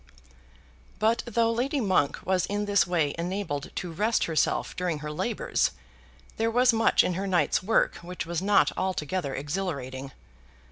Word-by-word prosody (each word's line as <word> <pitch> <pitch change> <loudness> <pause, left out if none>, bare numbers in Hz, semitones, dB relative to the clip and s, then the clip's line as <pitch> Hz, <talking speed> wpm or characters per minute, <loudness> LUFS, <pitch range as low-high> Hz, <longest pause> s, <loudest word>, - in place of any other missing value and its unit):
But 220 +3 +2
though 230 0 +2
Lady 260 +5 0
Monk 185 - +2
was 185 -1 +1
in 205 +1 -1
this 200 -3 +3
way 165 -5 +1
enabled 175 -5 -3
to 180 - -4
rest 215 +7 +1
herself 160 -2 0
during 180 -3 -1
her 150 0 -6
labours, 150 - 0 0.7
there 225 +1 +1
was 245 +1 +4
much 225 0 +4
in 180 - 0
her 195 +3 -3
night's 175 -6 +2
work 220 +4 +2
which 180 0 -6
was 170 0 -2
not 205 +1 +4
altogether 185 -5 -2
exhilarating. 140 -4 -4
185 Hz, 150 wpm, -27 LUFS, 155-210 Hz, 0.7 s, was